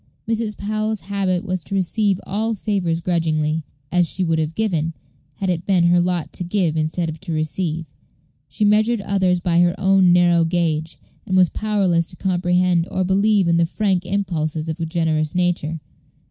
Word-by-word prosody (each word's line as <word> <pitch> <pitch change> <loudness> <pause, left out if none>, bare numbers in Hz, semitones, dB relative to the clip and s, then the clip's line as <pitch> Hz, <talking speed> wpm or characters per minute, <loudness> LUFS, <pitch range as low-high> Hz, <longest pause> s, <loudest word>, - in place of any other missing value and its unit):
Mrs. 225 -1 -1
Powell's 215 +1 -2
habit 190 0 -1
was 185 -3 -3
to 195 - -5
receive 195 +1 +1
all 220 +3 -1
favors 185 -6 -1
grudgingly, 160 -2 0 0.3
as 175 -1 +3
she 185 - -2
would 165 -2 +1
have 155 +1 -2
given, 165 -7 -1 0.4
had 195 - -3
it 175 -2 -2
been 185 -3 +3
her 175 0 +4
lot 175 -2 -2
to - - -5
give 175 -3 0
instead 160 +2 -1
of 160 0 -6
to 190 -3 -6
receive. 160 +1 -2 0.6
She 210 +10 0
measured 215 +2 +3
others 190 -2 +1
by 170 -1 +1
her 175 0 +3
own 190 -1 +4
narrow 175 -1 +4
gauge, 160 -2 -1 0.3
and 185 - +1
was 180 -2 +5
powerless 190 -6 0
to - - -10
comprehend 180 -1 +1
or 185 - -1
believe 200 +1 +2
in 170 0 +3
the 170 - +3
frank 190 -1 0
impulses 165 -5 -2
of 160 +1 -4
a 165 - -2
generous 160 -2 -1
nature. 175 -3 0
180 Hz, 175 wpm, -21 LUFS, 165-195 Hz, 0.6 s, was